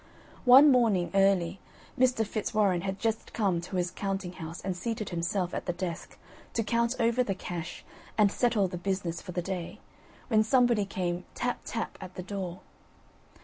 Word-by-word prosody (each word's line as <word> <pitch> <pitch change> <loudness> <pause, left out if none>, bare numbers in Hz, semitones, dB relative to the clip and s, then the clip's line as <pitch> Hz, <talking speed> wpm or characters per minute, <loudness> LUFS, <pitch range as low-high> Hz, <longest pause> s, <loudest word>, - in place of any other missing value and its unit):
One 270 +4 +9
morning, 220 -9 +3
early, 195 -2 +3 0.4
Mr. 250 -3 +3
Fitzwarren 205 -3 +1
had 190 +1 -3
just 225 0 -2
come 190 -6 +1
to 180 +2 -7
his 180 -1 0
counting 195 -2 -3
house 165 -1 -7
and 190 -1 -3
seated 215 +2 -3
himself 175 +1 -1
at - - -4
the 175 - 0
desk, 175 -1 -5 0.4
to 230 - +1
count 235 +3 +1
over 235 +1 +3
the 195 -5 -2
cash, 175 -2 -6 0.3
and 210 -2 +5
settle 225 -5 +2
the 180 -1 -6
business 180 -3 -2
for 185 - -8
the 175 0 -2
day, 180 -2 -5 0.5
when 220 -3 +4
somebody 235 -2 +3
came 180 -2 -3
tap, 245 0 -1
tap, 230 - -4
at 185 - -9
the 185 - -5
door. 185 -2 -5
195 Hz, 170 wpm, -29 LUFS, 180-225 Hz, 0.5 s, One